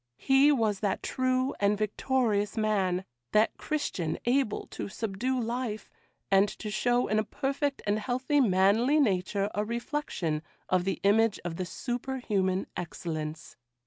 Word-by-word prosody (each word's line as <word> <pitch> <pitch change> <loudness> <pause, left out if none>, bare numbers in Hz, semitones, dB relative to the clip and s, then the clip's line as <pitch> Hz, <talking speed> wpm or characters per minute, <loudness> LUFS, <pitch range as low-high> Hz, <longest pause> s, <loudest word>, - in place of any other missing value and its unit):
He 270 - +5
was 220 -7 +1
that 205 -3 -1
true 255 +1 0
and 205 0 +2
victorious 215 0 0
man; 195 -4 +1 0.3
that 215 +1 +4
Christian 185 - -2
able 250 -2 +1
to - - -5
subdue 230 +6 -2
life, 230 -2 -3 0.4
and 195 +1 +5
to 210 - -6
show 245 +3 +2
in 215 - +2
a - - +1
perfect 275 +4 -2
and 210 +1 +1
healthy 255 +6 0
manly 220 +7 +4
nature 200 -4 +1
a 205 - 0
reflection 235 - -2 0.3
of 185 -1 +2
the 190 -3 -1
image 215 +2 +3
of 165 -1 -4
the 185 - -2
superhuman 230 -6 -1
excellence. 155 -4 -5
215 Hz, 140 wpm, -29 LUFS, 195-255 Hz, 0.4 s, He